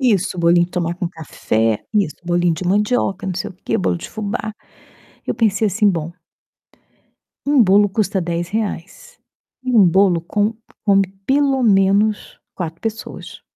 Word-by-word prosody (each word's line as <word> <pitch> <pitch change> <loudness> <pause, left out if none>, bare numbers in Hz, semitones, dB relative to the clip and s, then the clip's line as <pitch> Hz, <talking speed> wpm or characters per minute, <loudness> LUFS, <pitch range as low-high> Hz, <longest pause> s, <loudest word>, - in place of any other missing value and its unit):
Isso, 200 -7 +1
bolinho 170 0 +4
de 180 - -23
tomar 175 -1 -1
com 175 0 -3
café, 115 - -2
isso, 200 -7 +1
bolinho 175 -1 +1
de 170 +3 -6
mandioca, 200 0 0
não 185 - -2
sei 175 - -4
o - - -14
quê, - - 0
bolo 90 -1 0
de - - -8
fubá. 215 0 -4 0.7
Eu - - -1
pensei 220 -2 +2
assim: 205 +2 +2
"Bom" 165 -2 -3 1.3
um 280 -3 +4
bolo 205 +2 +4
custa 200 -1 -1
R$10, 195 - -4 0.5
e 255 - -1
um 210 -4 +7
bolo 180 -1 +3
com 210 +5 -1 0.3
come, 195 -2 +4 0.2
pelo 275 -1 +2
menos, 205 0 +2 0.2
4 165 -2 -5
pessoas 220 -1 -6
195 Hz, 150 wpm, -19 LUFS, 175-215 Hz, 1.3 s, um